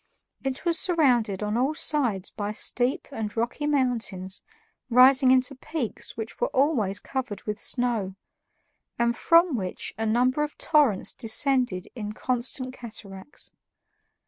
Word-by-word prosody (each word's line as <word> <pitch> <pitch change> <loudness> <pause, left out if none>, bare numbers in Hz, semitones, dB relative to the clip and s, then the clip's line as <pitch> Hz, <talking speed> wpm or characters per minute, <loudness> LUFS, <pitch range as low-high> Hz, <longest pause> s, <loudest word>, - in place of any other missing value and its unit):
It 270 +5 -4
was 335 -1 +2
surrounded 245 - +2
on 210 +2 -1
all 270 +5 +1
sides 240 - 0
by 205 0 -4
steep 250 +8 +2
and 220 -4 -5
rocky 240 +6 -1
mountains 230 -9 -1 0.5
rising 260 +2 +6
into 260 +1 +3
peaks 275 -2 -4
which 225 0 -7
were - - +2
always 240 -9 +1
covered 260 -5 -5
with 210 -1 -5
snow 230 -7 0 0.8
and 235 0 +1
from 335 0 +4
which 185 -5 -5
a 225 - -1
number 250 +5 +2
of 300 0 -3
torrents 285 - +3
descended 245 -4 +1
in 210 -3 -6
constant 255 +2 -3
cataracts. 215 -1 -9
245 Hz, 130 wpm, -26 LUFS, 215-275 Hz, 0.8 s, rising